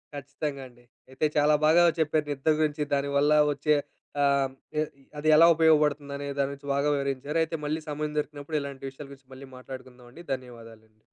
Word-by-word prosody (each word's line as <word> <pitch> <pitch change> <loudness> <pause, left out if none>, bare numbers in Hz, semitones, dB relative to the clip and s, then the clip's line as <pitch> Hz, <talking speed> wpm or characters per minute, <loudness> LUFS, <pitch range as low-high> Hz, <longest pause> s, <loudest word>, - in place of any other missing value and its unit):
ఖచ్చితంగా 140 0 -5
అండి. 120 -1 -21 0.3
అయితే 130 +4 -1
చాలా 150 +1 +4
బాగా 165 +3 +6 0.2
చెప్పారు 155 -1 +1
నిద్ర 145 +2 +1
గురించి 150 -1 0
దాని 140 0 -1
వల్ల 145 +2 +3 0.2
వచ్చే 150 +2 +1 0.5
ఆహ్, 140 -1 +2 0.3
ఎ - - +3 0.4
అది 150 +1 -3
ఎలా 165 +2 +8
ఉపయోగపడుతుందనే 150 -3 +2
దాని 140 0 +1
గురించి 140 0 -9
బాగా 140 +1 +1
వివరించారు. 140 +2 -2
అయితే 160 0 -4
మళ్ళీ 155 +2 -2
సమయం 150 0 -3
దొరికినప్పుడు 150 +1 -3
ఇలాంటి 140 -1 -8
విషయాల 135 +2 -11
గురించి 135 -1 -16
మళ్ళీ 135 +1 -11
మాట్లాడుకుందామండి. 130 +3 -11
ధన్యవాదాలండి. 115 -4 -10
140 Hz, 160 wpm, -27 LUFS, 135-150 Hz, 0.5 s, ఎలా